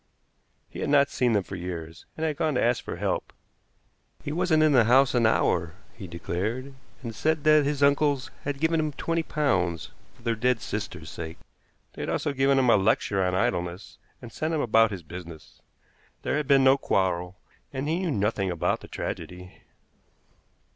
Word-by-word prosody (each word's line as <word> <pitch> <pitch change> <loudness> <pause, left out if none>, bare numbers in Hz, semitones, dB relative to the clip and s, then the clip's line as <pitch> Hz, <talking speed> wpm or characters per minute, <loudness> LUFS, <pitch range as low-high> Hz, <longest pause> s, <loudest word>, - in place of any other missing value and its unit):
He - - -10
had - - -2
not 140 -1 +4
seen 125 -2 +1
them 100 -2 +2
for 100 - -8
years, 85 -3 -7
and 160 - -1
had 155 -2 -1
gone 155 -2 0
to - - +2
ask 120 0 +1
for - - -5
help. - - -2 0.9
He 145 - -4
wasn't 160 -1 +2
in 155 - +4
the 125 -5 +5
house 130 +3 +5
an 120 -3 +4
hour, 85 -5 +1 0.2
he 100 -5 -9
declared, 105 +10 -4 0.3
and 115 -2 -5
said 155 +7 0
that 155 -1 +5
his 145 0 0
uncles 140 -1 +2
had 140 -1 -3
given 160 +1 +2
him 155 -1 -1
twenty 165 +4 -1
pounds, 95 - -1 0.2
for - - -22
their 115 -1 +1
dead 120 +2 +1
sister's 90 -8 -5
sake. 80 0 -7 0.6
They - - -8
had - - -3
also 145 - -1
given 135 0 +3
him 125 -3 +4
a - - +6
lecture 100 -1 +1
on 90 0 0
idleness, 90 -4 -2 0.2
and 120 - -9
sent 155 +6 -2
him - - 0
about 115 -2 +4
his 95 -4 -7
business. 85 -1 -11 0.6
There - - 0
had 150 -2 -1
been 135 -1 +5
no 135 +1 +5
quarrel, 90 -3 0 0.3
and 135 +1 -3
he 165 +3 0
knew 185 -2 -1
nothing 105 -5 0
about 85 -2 0
the - - -12
tragedy. 90 +1 -6
120 Hz, 190 wpm, -26 LUFS, 95-145 Hz, 0.9 s, a